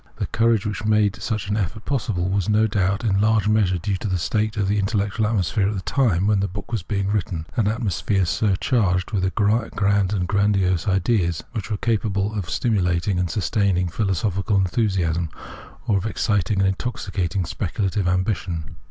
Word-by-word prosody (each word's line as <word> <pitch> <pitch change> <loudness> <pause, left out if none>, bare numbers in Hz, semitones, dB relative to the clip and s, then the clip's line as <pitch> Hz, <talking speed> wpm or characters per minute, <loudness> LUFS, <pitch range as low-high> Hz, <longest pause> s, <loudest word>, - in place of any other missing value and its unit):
The - - -2
courage 115 -2 +1
which 105 -1 -3
made 105 -2 +2
such 110 -3 -2
an 105 - 0
effort 105 +1 -3
possible 110 -10 -1
was, 95 0 0
no 105 +1 +4
doubt, 100 -1 0
in 100 -3 +2
large 110 -1 +3
measure 105 -4 +2
due 95 +3 -2
to 105 - -4
the 95 -2 0
state 110 +5 -1
of 100 -2 +1
the 105 +1 +1
in 100 - +1
tellectual 105 +1 0
atmosphere 100 -1 +1
at 105 - -3
the 95 - -3
time 100 -7 +1
when 105 -1 +3
the 100 - 0
book 100 +5 -8
was 110 -7 -2
written, 100 -5 -1
an 115 -5 +2
atmosphere 105 -3 0
surcharged 95 - +1
with 95 -3 -1
grand 100 -2 +1
and 95 -4 -1
grandiose 100 -3 +1
ideas, 95 -3 +1
which 110 -5 -5
were 105 - -1
capable 105 -2 0
of 100 -5 -4
stimulating 90 -5 0
and 90 -1 0
sustaining 95 -3 0
philosophical 100 +1 0
enthusiasm, 90 -4 0 0.6
or 105 - +2
of 100 - -3
exciting 100 -2 0
and 95 - +3
intoxicating 95 -4 -2
speculative 95 +3 -2
ambition. 90 -3 -2
100 Hz, 175 wpm, -22 LUFS, 95-105 Hz, 0.6 s, no